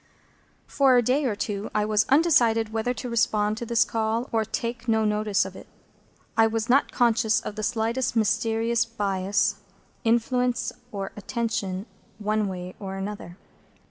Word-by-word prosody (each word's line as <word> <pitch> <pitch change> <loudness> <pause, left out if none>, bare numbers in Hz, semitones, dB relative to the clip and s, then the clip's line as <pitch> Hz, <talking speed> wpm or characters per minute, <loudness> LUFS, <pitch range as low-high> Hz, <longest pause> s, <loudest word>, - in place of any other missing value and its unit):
For 270 -3 +4
a 245 - +4
day 270 +5 +1
or 225 -5 0
two 205 0 -3
I 210 0 +2
was 210 0 +2
undecided 240 -8 +3
whether 225 +2 0
to 250 0 -5
respond 215 -2 +1
to 235 - -5
this 235 +1 +3
call, 225 +2 -1
or 225 -1 +1
take 230 +2 -4
no 220 -1 +2
notice 210 -1 +1
of - - -8
it. - - -11 0.7
I 225 0 +5
was 225 0 -2
not 265 +3 +3
conscious 230 -2 +2
of 205 - -7
the 215 - -4
slightest 230 +3 -1
mysterious 225 +1 +1
bias, 200 -2 0 0.5
influence, 245 +2 +1 0.2
or 195 -2 -4
attraction, 210 -3 -3 0.3
one 215 0 0
way 180 -1 -6
or 195 -1 -5
other. 195 -3 -6
225 Hz, 155 wpm, -25 LUFS, 210-235 Hz, 0.7 s, I